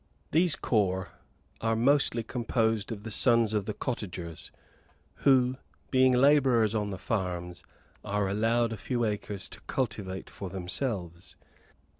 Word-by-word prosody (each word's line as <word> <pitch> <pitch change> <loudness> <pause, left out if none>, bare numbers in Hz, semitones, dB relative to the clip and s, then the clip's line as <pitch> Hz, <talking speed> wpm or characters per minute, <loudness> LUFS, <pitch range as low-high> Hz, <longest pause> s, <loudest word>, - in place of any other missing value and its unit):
These 170 +1 +4
corps 95 -5 0 0.5
are 115 0 +1
mostly 120 -1 +3
composed 115 -2 -1
of 105 -2 -6
the 110 - -6
sons 115 -1 +4
of 105 -2 0
the 105 - -3
cottagers, 90 -9 -5 0.7
who 130 -2 +3 0.3
being 130 -1 +5
labourers 125 -4 +4
on 105 -2 -1
the 95 - -5
farms, 90 -4 -3 0.4
are 100 0 -1
allowed 115 +3 +1
a - - -6
few 120 +3 -1
acres 105 -2 -3
to - - -9
cultivate 105 -7 -3
for 95 - -7
themselves. 95 -2 -4
110 Hz, 130 wpm, -29 LUFS, 95-125 Hz, 0.7 s, being